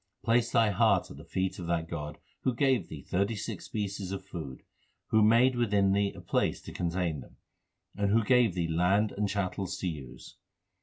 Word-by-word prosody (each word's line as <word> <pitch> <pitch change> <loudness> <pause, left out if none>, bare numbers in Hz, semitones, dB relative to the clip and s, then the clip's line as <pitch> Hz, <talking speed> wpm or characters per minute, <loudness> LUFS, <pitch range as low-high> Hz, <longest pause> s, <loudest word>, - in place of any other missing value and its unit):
Place 115 0 +3
thy 115 -2 +4
heart 100 -2 +2
at - - -10
the 75 - -10
feet 95 +4 -2
of 85 - -5
that 85 -1 0
God 75 -3 -5 0.2
Who 130 - 0
gave 135 0 +2
thee - - -8
thirty 100 +5 0
six 105 - -5
species 100 -3 -4
of 95 -1 -5
food, 80 -9 -7 0.5
Who 110 - +4
made 120 +4 +5
within 100 -5 +2
thee 100 0 +2
a - - -9
place - - 0
to - - -8
contain 85 -3 -1
them, - - -14 0.6
And 100 0 0
who 115 +1 +4
gave 120 -5 +3
thee 85 -2 0
land 90 +6 +2
and 105 0 -1
chattels 95 -1 -2
to 95 - -3
use. 75 -7 -8
100 Hz, 195 wpm, -30 LUFS, 85-110 Hz, 0.6 s, made